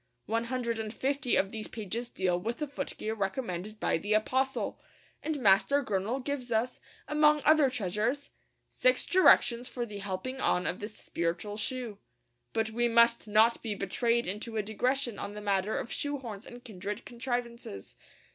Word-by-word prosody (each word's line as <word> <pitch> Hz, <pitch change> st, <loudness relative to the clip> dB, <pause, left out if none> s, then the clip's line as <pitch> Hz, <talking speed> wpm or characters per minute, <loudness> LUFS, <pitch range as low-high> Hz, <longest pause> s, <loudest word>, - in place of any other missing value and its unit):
One 230 Hz, +2 st, 0 dB
hundred 235 Hz, -2 st, -2 dB
and 215 Hz, -1 st, -3 dB
fifty 270 Hz, +1 st, 0 dB
of 195 Hz, -, +2 dB
these 220 Hz, -1 st, -4 dB
pages 230 Hz, +3 st, -4 dB
deal 180 Hz, -2 st, 0 dB
with 230 Hz, +6 st, -3 dB
the 300 Hz, -, -2 dB
footgear 275 Hz, -6 st, -3 dB
recommended 200 Hz, -1 st, -3 dB
by -, -, +1 dB
the 205 Hz, +5 st, 0 dB
apostle; 260 Hz, +5 st, 0 dB, 0.4 s
and 310 Hz, -1 st, -2 dB
Master 235 Hz, +6 st, +4 dB
Gurnall 220 Hz, +5 st, -1 dB
gives 270 Hz, -4 st, -3 dB
us, 230 Hz, +3 st, 0 dB, 0.3 s
among 300 Hz, 0 st, +4 dB
other 305 Hz, -3 st, +6 dB
treasures, 225 Hz, +5 st, -1 dB, 0.4 s
'six -, -, +2 dB
directions 250 Hz, -9 st, +5 dB
for 240 Hz, -2 st, -3 dB
the 210 Hz, -3 st, -7 dB
helping 200 Hz, +7 st, -4 dB
on 180 Hz, -, +2 dB
of 180 Hz, -, -1 dB
this 210 Hz, +1 st, -7 dB
spiritual 175 Hz, +5 st, -3 dB
shoe.' 230 Hz, -1 st, -4 dB, 0.5 s
But 225 Hz, 0 st, 0 dB
we 240 Hz, +2 st, +2 dB
must 235 Hz, 0 st, +4 dB
not 220 Hz, +3 st, +4 dB
be 215 Hz, -3 st, -3 dB
betrayed 230 Hz, +5 st, +1 dB
into 215 Hz, +4 st, -2 dB
a 215 Hz, -, +1 dB
digression 240 Hz, +2 st, 0 dB
on 205 Hz, -, -5 dB
the -, -, -5 dB
matter 200 Hz, 0 st, 0 dB
of -, -, -4 dB
shoe 285 Hz, 0 st, -2 dB
horns 225 Hz, -6 st, -8 dB
and 245 Hz, 0 st, -11 dB
kindred 205 Hz, 0 st, -6 dB
contrivances. 235 Hz, -, -4 dB
230 Hz, 165 wpm, -30 LUFS, 205-255 Hz, 0.5 s, other